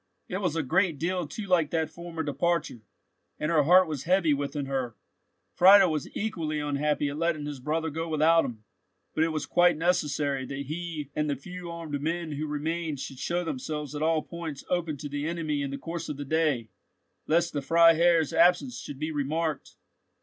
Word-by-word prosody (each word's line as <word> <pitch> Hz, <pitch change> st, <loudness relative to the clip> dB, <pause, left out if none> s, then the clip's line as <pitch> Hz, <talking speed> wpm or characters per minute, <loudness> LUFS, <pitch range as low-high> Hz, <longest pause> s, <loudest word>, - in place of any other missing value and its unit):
It 185 Hz, -, -3 dB
was 180 Hz, -5 st, 0 dB
a 160 Hz, -, 0 dB
great 170 Hz, +3 st, +1 dB
deal 175 Hz, +1 st, -1 dB
too 200 Hz, +8 st, -6 dB
like 175 Hz, -6 st, +2 dB
that 160 Hz, -1 st, -1 dB
former 170 Hz, -1 st, -6 dB
departure, 150 Hz, -3 st, -1 dB, 0.6 s
and 150 Hz, -, -1 dB
her 160 Hz, -3 st, +4 dB
heart 180 Hz, +3 st, +6 dB
was 150 Hz, -4 st, -4 dB
heavy 175 Hz, -3 st, +3 dB
within 145 Hz, 0 st, -2 dB
her! 130 Hz, -4 st, -3 dB, 0.6 s
Friedel 190 Hz, 0 st, +7 dB
was 150 Hz, -3 st, -3 dB
equally 165 Hz, -8 st, -2 dB
unhappy 145 Hz, 0 st, 0 dB
at 145 Hz, +2 st, -5 dB
letting 165 Hz, -3 st, 0 dB
his 145 Hz, -2 st, -5 dB
brother 155 Hz, +4 st, -2 dB
go 165 Hz, +2 st, -3 dB
without 160 Hz, +2 st, +4 dB
him, 110 Hz, -3 st, -6 dB, 0.5 s
but 155 Hz, -, +2 dB
it -, -, +3 dB
was 155 Hz, -2 st, -2 dB
quite 175 Hz, -2 st, +4 dB
necessary 150 Hz, -5 st, 0 dB
that 140 Hz, +1 st, -5 dB
he 155 Hz, -1 st, -5 dB
and 150 Hz, 0 st, 0 dB
the 140 Hz, -, 0 dB
few 180 Hz, +6 st, -8 dB
armed 165 Hz, -4 st, -5 dB
men 165 Hz, +1 st, -2 dB
who 150 Hz, +1 st, -3 dB
remained 155 Hz, 0 st, -3 dB
should 135 Hz, -1 st, -7 dB
show 175 Hz, +1 st, -1 dB
themselves 150 Hz, -1 st, -4 dB
at 145 Hz, -, -4 dB
all 160 Hz, 0 st, +2 dB
points 165 Hz, -5 st, -7 dB
open 170 Hz, -4 st, 0 dB
to 145 Hz, -, -6 dB
the 145 Hz, +1 st, -3 dB
enemy 160 Hz, -4 st, -2 dB
in 140 Hz, -, -2 dB
the 140 Hz, -, -4 dB
course 165 Hz, +3 st, -5 dB
of 150 Hz, -, -4 dB
the 145 Hz, -, -5 dB
day, 145 Hz, -7 st, 0 dB, 0.6 s
lest 170 Hz, +2 st, +2 dB
the 145 Hz, -, -1 dB
Freiherr's 165 Hz, +1 st, +4 dB
absence 180 Hz, +9 st, +3 dB
should 145 Hz, -, -8 dB
be 155 Hz, +3 st, -3 dB
remarked. 150 Hz, 0 st, -2 dB
155 Hz, 195 wpm, -28 LUFS, 145-170 Hz, 0.6 s, Friedel